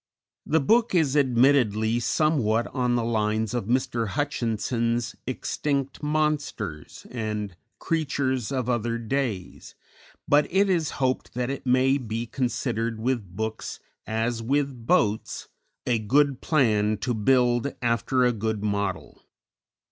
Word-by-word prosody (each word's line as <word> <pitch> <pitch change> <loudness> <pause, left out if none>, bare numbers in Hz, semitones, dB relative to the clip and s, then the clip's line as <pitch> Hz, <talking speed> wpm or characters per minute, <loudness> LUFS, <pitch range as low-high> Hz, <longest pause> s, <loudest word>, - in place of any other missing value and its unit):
_ - - -7
_The 140 - 0
book 230 - +3
is 150 -5 +2
admittedly 120 -4 +3
somewhat 120 -5 +1
on 125 -2 +1
the 120 - +1
lines 110 -1 0
of 120 -4 -2
Mr. 120 -2 0
Hutchinson's 115 -1 -1
"Extinct 140 +1 -2
Monsters" 150 - -2
and 105 -5 -3 0.2
"Creatures 135 -6 -1
of 130 -3 -1
Other 120 -1 0
Days," 115 -5 -3 0.5
but 145 +1 +3
it 195 +2 +3
is 165 -4 +1
hoped 130 -2 -1
that 125 +1 -1
it 140 -1 -6
may 130 +2 +3
be 115 -1 -4
considered 120 -3 -2
with 110 -7 -2
books 110 +1 -4 0.3
as 115 +1 -1
with 135 -1 -1
boats, 105 +1 +1 0.4
a 120 -2 +1
good 135 +5 +2
plan 110 -8 +2
to 105 +5 -2
build 120 +3 +2
after 120 +2 +1
a 125 - +3
good 110 -1 -2
model. 100 -2 -2
120 Hz, 125 wpm, -25 LUFS, 110-135 Hz, 0.5 s, book